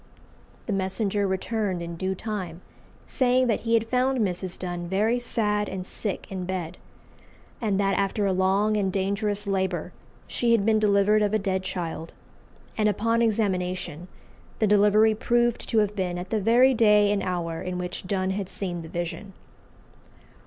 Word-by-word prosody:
The 215 - -2
messenger 195 +1 0
returned 190 -1 -2
in 170 0 -6
due 190 +2 -2
time, 185 -5 -5 0.4
saying 255 -1 +2
that 230 -3 +1
he 230 0 +1
had 225 0 +1
found 255 +2 +1
Mrs. 185 -4 -1
Donne 175 -1 -4
very 215 +6 +1
sad 210 -3 0
and 185 -1 -5
sick 205 +1 -4
in 185 -1 -4
bed, 180 -2 -4 0.8
and 205 -4 0
that 195 -1 +2
after 200 +1 0
a 195 - +2
long 195 +3 +2
and 195 -2 0
dangerous 200 +2 -1
labour 190 -3 -1 0.3
she 235 -1 +1
had 210 -4 +2
been 220 -1 +3
delivered 210 0 +3
of 210 0 +1
a - - +5
dead 190 -2 -1
child; 170 -3 -5 0.6
and 215 -1 +2
upon 230 +3 +1
examination, 185 -6 -1 0.5
the 220 - +2
delivery 210 +1 +5
proved 240 +2 0
to 225 - +1
have 210 -1 +2
been 180 -3 -2
at 180 +1 -7
the 220 -2 +1
very 245 +5 +5
day 210 -3 +4
and 205 -1 +1
hour 170 -3 -3
in 180 0 -4
which 180 +1 -5
Donne 190 -1 0
had 195 -1 -3
seen 175 -3 -4
the 160 - -9
vision. 175 +4 -5
200 Hz, 165 wpm, -26 LUFS, 185-215 Hz, 0.8 s, a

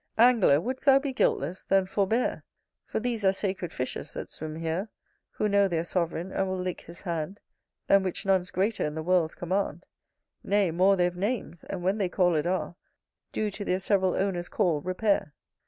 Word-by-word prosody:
Angler! 225 - +6
would'st 255 - -4
thou 270 -1 +8
be 275 -1 -2
guiltless? 175 - 0
then 195 -1 +3
forbear; 205 +5 0 0.4
For - - -2
these 230 -2 -2
are 190 - +5
sacred 190 -3 -3
fishes 130 +3 -5
that - - -6
swim 155 0 -6
here, 165 +6 -2 0.4
Who 210 - 0
know 200 -1 +4
their 165 -3 -1
sovereign, 170 +1 -2
and 195 - 0
will 185 0 -2
lick 180 -1 -3
his 170 +1 -12
hand, 170 +1 -3 0.5
Than 195 - +5
which 185 0 -3
none's 190 -2 +2
greater 200 +4 0
in 150 0 -2
the 160 - -3
world's 175 -2 +2
command; 180 -1 -2 0.6
Nay 200 -3 +2
more 185 +4 +4
they've 175 -1 +1
names, 200 -2 -3
and, 185 -3 -5
when 195 +4 +1
they 190 -3 +1
called 175 -4 +2
are, 185 -1 -1 0.6
Do 215 -1 -1
to 200 +1 -5
their 185 -1 0
several 190 -1 +2
owner's 180 -3 -1
call 175 -8 +1
repair. 185 -3 0
185 Hz, 185 wpm, -28 LUFS, 175-200 Hz, 0.6 s, thou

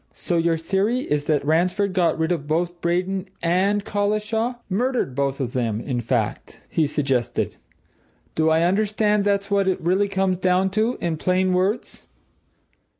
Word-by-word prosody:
"So 175 - -2
your 165 0 +2
theory 195 +9 0
is 150 - -1
that 150 -3 +1
Ransford 180 +5 +1
got 175 -4 +2
rid 160 +1 0
of 155 -5 -2
both 170 +3 -1
Braden 180 +3 -1 0.2
and 195 +4 +1
Collishaw 215 +4 -1
murdered 235 - 0
both 140 +1 -1
of 125 -3 -3
them, 115 -4 -1
in 120 0 -3
fact?" 115 -2 -2
he 155 -2 +2
suggested. 135 -4 -1 0.8
"Do 160 0 +2
I 160 +1 +3
understand 210 +2 +2
that's 200 0 0
what 200 -1 +2
it 190 - +1
really 185 +4 +1
comes 190 -2 0
to 190 +6 +1
in 165 -2 -1
plain 185 +2 +1
words?" 195 +6 -1
180 Hz, 150 wpm, -23 LUFS, 160-200 Hz, 0.8 s, I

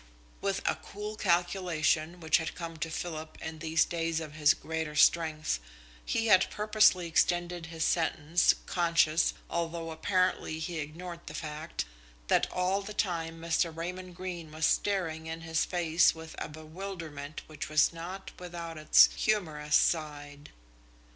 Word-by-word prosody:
With 195 0 -1
a - - +2
cool 210 +1 -6
calculation 175 -3 +1
which 160 -1 +4
had 165 - -4
come 165 -1 -6
to 165 +1 -3
Philip 160 -1 -5
in 160 0 -6
these 160 0 +2
days 165 -1 -1
of 155 -2 -7
his 155 +1 +4
greater 160 -2 -4
strength, 155 - +3 0.4
he 225 - 0
had 195 -4 +5
purposely 210 -4 +3
extended 175 +1 +1
his 165 -1 -2
sentence, 165 0 +2
conscious, 165 -2 +2
although 165 -1 -3
apparently 185 -1 0
he 160 +1 -4
ignored 170 +4 -6
the - - -6
fact, 155 +1 -4 0.4
that - - +3
all 185 +2 +1
the 205 +1 -8
time 165 -4 -1
Mr. 165 0 +1
Raymond 180 +2 -6
Greene 175 -3 -6
was 155 +1 0
staring 165 -4 0
in 165 0 -5
his 160 -1 0
face 170 -2 +3
with 160 0 -9
a - - -4
bewilderment 155 -2 -7
which 155 -1 -7
was 155 +2 +4
not 180 +4 -7
without 170 -2 -7
its 155 - +7
humorous 155 -8 0
side. 145 -2 0
165 Hz, 145 wpm, -30 LUFS, 155-180 Hz, 0.4 s, its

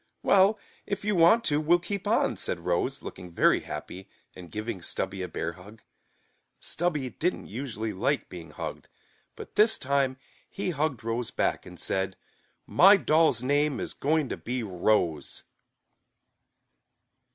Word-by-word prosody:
"Well, 200 +2 +5 0.3
if 200 0 -3
you 210 -1 +1
want 175 +7 +5
to, 150 -7 +2
we'll 170 +3 +4
keep 180 +3 -5
on," - - +2
said - - -2
Rose, - - -1
looking 90 -1 -8
very 85 - +3
happy, 95 +1 -8 0.3
and 90 -2 -10
giving 110 -2 -5
Stubby 95 +2 -2
a 90 - -3
bear 85 0 -3
hug. 100 +5 -15 0.8
Stubby 155 -7 -2
didn't 180 +3 -2
usually 110 -2 -4
like 95 - 0
being 85 -3 -10
hugged, 75 - -7 0.5
but - - -10
this 220 +2 +5
time 135 -1 0 0.3
he 190 -2 -3
hugged 145 -6 -2
Rose 115 +1 -2
back, - - -1
and - - -11
said, 95 0 -1 0.5
"My 195 +3 +7
doll's 160 -7 +3
name 145 +1 +1
is - - -5
going 155 0 +1
to - - -3
be 125 0 -3
Rose." 90 -4 0
130 Hz, 145 wpm, -27 LUFS, -, 0.8 s, My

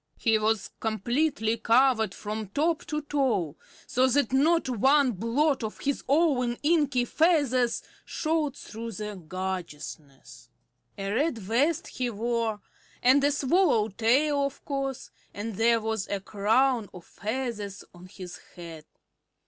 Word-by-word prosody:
He 225 -1 +2
was 215 -1 0
completely 225 +2 0
covered 230 0 +3
from 215 0 -5
top 315 - 0
to 300 0 -3
toe, 255 - 0 0.3
so 260 -2 +2
that 260 -1 +1
not 320 +5 +3
one 265 +3 +3
blot 240 - 0
of 215 - -5
his 280 0 -1
own 270 -6 +2
inky 290 -6 +2
feathers 275 -6 +2 0.2
showed 310 -3 -1
through 230 +1 -7
the 210 +1 -5
gorgeousness. 155 -8 -7 0.5
A 195 0 -3
red 280 +2 +1
vest 240 - 0
he 250 -1 -3
wore, 230 -1 -2 0.4
and 265 +3 +5
a 285 - +4
swallow 285 - +2
tail, 275 +8 +2
of 280 -1 -4
course, 275 -2 -4 0.2
and 215 +2 -4
there 230 +3 +3
was 220 -2 -2
a 200 - -2
crown 220 +4 +1
of 180 - -11
feathers 215 -3 -4
on 180 +1 -13
his 185 -2 -9 0.2
head. 165 -3 -9
235 Hz, 130 wpm, -27 LUFS, 210-280 Hz, 0.5 s, and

